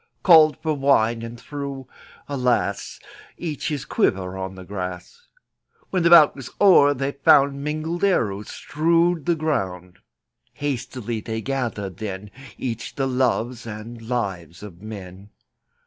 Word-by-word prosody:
Called 160 -4 +7
for 160 -1 +1
wine, 125 -5 +2
and 115 0 -8
threw 140 -1 -6 0.2
— - - -24
alas! 125 -3 -1 0.2
— - - -22
Each 155 -5 -4
his 150 -3 -3
quiver 95 - 0
on 95 0 -5
the 95 - -10
grass. 90 - -7 0.6
When 185 - +1
the 170 - +4
bout 165 -4 +8
was 135 -3 -8
o'er 145 -8 +6
they 135 +1 -2
found 140 0 +4
Mingled 155 +4 -3
arrows 105 - +1
strewed 165 +1 +1
the 170 - +3
ground. 95 - -3 0.5
Hastily 120 -5 -4
they 110 +1 -4
gathered 115 -8 -3
then 100 -1 -6 0.3
Each 120 -3 -5
the 135 - 0
loves 125 -2 -1
and 110 +2 -8
lives 95 -8 -4
of 90 -4 -11
men. 100 -2 -9
125 Hz, 140 wpm, -23 LUFS, 105-150 Hz, 0.6 s, bout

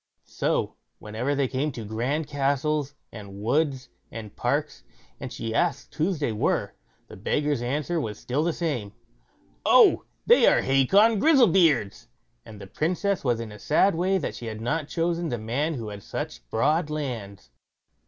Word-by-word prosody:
So, - - -2 0.2
whenever 115 +7 -3
they 140 -1 +1
came 140 +4 -1
to 115 -3 -7
grand 125 +9 -2
castles, 145 +1 -1 0.2
and 100 -3 -10
woods, 135 +3 0 0.2
and 110 -3 -8
parks, - - -2 0.4
and - - -6
she 115 -1 -4
asked - - -1
whose 165 +4 0
they 145 -5 -1
were? 105 - -1 0.3
the - - -11
beggar's 145 +7 -1
answer 150 +7 -1
was 105 -5 -5
still 135 +5 -2
the 170 - +1
same: 140 - -3 0.7
"Oh: - - +5 0.2
they - - +6
are - - +4
Hacon 195 - +4
Grizzlebeard's." 185 - +3 0.4
And 105 -2 -12
the 100 - -9
Princess 180 - -1
was 120 -4 +1
in 115 -2 -6
a 105 - -11
sad 190 - +3
way 185 +4 +1
that 170 - -3
she 120 - -8
had 110 -1 -5
not 145 +6 -2
chosen 170 0 -1
the 120 - -2
man 130 +9 -2
who 115 -4 -5
had 100 -1 -8
such - - -6
broad 150 +7 +1
lands. 115 - -5
140 Hz, 165 wpm, -25 LUFS, 115-160 Hz, 0.7 s, they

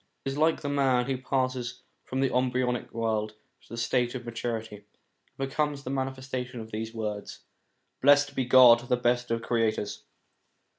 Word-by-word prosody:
It - - 0
is 135 - -5
like 160 +1 +3
the 145 - -4
man 135 -3 +2
who 135 -1 -2
passes 130 -2 -2 0.2
from 130 +1 -2
the 135 -2 +1
embryonic 125 -1 0
world 110 -2 -1 0.3
to - - -23
the 115 - -7
state 120 +2 0
of 125 -1 -6
maturity, 115 -2 -4
and 105 - -21 0.5
becomes 140 +1 -1
the 130 - -4
manifestation 130 -2 -4
of 110 0 -9
these 110 +1 -4
words: 105 -2 -5 0.3
* - - -48
Blessed 145 +1 +5
be 130 - 0
God, 125 -2 +8
the 125 - +3
best 120 0 +1
of 115 0 -1
Creators.' 115 -3 -1
125 Hz, 175 wpm, -28 LUFS, 115-130 Hz, 0.5 s, God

